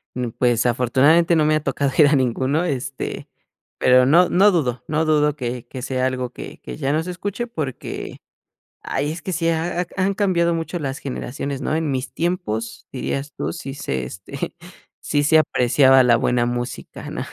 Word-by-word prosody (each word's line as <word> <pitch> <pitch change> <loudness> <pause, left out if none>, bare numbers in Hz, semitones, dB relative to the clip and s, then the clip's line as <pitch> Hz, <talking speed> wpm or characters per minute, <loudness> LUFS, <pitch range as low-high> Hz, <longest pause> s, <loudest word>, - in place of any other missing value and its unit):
Mm, 125 -1 -2
pues, 120 -1 +1
afortunadamente 135 +8 +4
no 155 -1 +3
me 155 - +3
ha 155 - -1
tocado 140 0 0
ir 150 -3 +7
a 150 - +3
ninguno, 130 +5 +1
este, 135 -3 -4 0.5
pero 125 0 +5
no 170 +6 +5
no 200 +3 +5
dudo 125 - -1
no 155 +1 0
dudo 150 -1 +2
que 125 -3 -4
que 130 +1 -7
sea 130 0 -1
algo 130 -1 -2
que - - -9
que - - -8
ya 140 -2 -1
no 155 - +1
se 180 - -5
escuche 205 +6 -4
porque, 150 - -5 0.7
¡ay!, 145 +2 -2
es 165 - -8
que 185 - -4
sí 165 0 0
ha 165 +2 0
ha - - -6
han 195 +1 +1
cambiado 175 -4 +2
mucho 165 +2 -3
las 135 -2 -3
generaciones, 140 +1 -5
¿no? 155 - -1
"En 160 -2 -1
mis 130 -1 -3
tiempos", 115 -11 -3
dirías 135 +2 -3
tú, 75 +3 -3
sí 135 +8 -7
se, 65 - -3
este, 95 - -7 0.4
sí 145 -1 0
se 160 +2 +5
apreciaba 130 -2 +4
la 120 -2 +5
buena 120 +1 +1
música, 120 +1 -5
¿no? - - -4
140 Hz, 190 wpm, -21 LUFS, 125-165 Hz, 0.7 s, ir